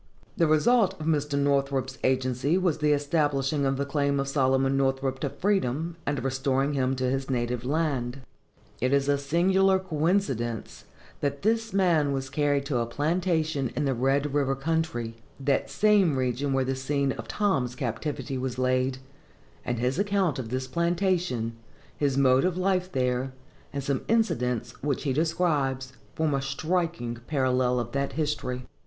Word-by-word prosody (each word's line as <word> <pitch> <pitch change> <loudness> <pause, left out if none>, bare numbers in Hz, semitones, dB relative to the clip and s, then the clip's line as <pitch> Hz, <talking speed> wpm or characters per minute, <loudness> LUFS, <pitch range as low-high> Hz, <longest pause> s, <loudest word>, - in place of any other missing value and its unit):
The 170 -6 +3
result 200 +7 +3
of 155 - -5
Mr. 150 -2 0
Northrop's 140 -2 0
agency 130 +4 +1
was 180 -5 +1
the 150 0 +2
establishing 145 -1 +1
of 135 0 0
the 140 - -1
claim 140 0 0
of 135 - -1
Solomon 135 -1 +2
Northrop 135 -1 0
to - - -1
freedom, 170 -4 -1
and 145 0 0
the 120 - -4
restoring 135 +1 0
him 135 -1 +1
to 130 - -3
his 135 +1 -1
native 120 -1 -1
land. 135 -3 -1 0.6
It 130 +3 +1
is 140 0 +2
a 145 -1 +2
singular 190 +6 +3
coincidence 155 - -1 0.3
that 140 0 -2
this 225 +1 +1
man 170 -7 +2
was 135 -1 -3
carried 145 -1 +1
to 135 -4 0
a 115 - -1
plantation 155 -1 0
in 145 +3 0
the 135 - +1
Red 135 +3 +1
river 135 -2 +1
country, 135 -6 -2 0.2
that 140 0 0
same 200 -9 +3
region 130 +2 -1
where 135 -1 +1
the 135 - 0
scene 140 +1 0
of 115 -3 -6
Tom's 135 - 0
captivity 130 +3 -3
was 130 -1 -3
laid; 130 0 +1 0.7
and 120 - -2
his 125 +7 0
account 200 -8 +1
of 115 -3 -5
this 130 +2 -2
plantation, 170 - 0 0.4
his 140 -2 0
mode 130 -1 +4
of 180 -1 0
life 185 0 0
there, 125 -1 0 0.4
and 140 -1 -4
some 135 -1 -1
incidents 125 - +1
which 140 -2 -1
he 140 -3 0
describes, 145 -5 0 0.2
form 160 -2 +1
a 135 - 0
striking 155 -3 -2
parallel 130 -3 +1
to 120 - -15
that 140 +1 -2
history. 135 -5 -2
140 Hz, 160 wpm, -27 LUFS, 130-160 Hz, 0.7 s, mode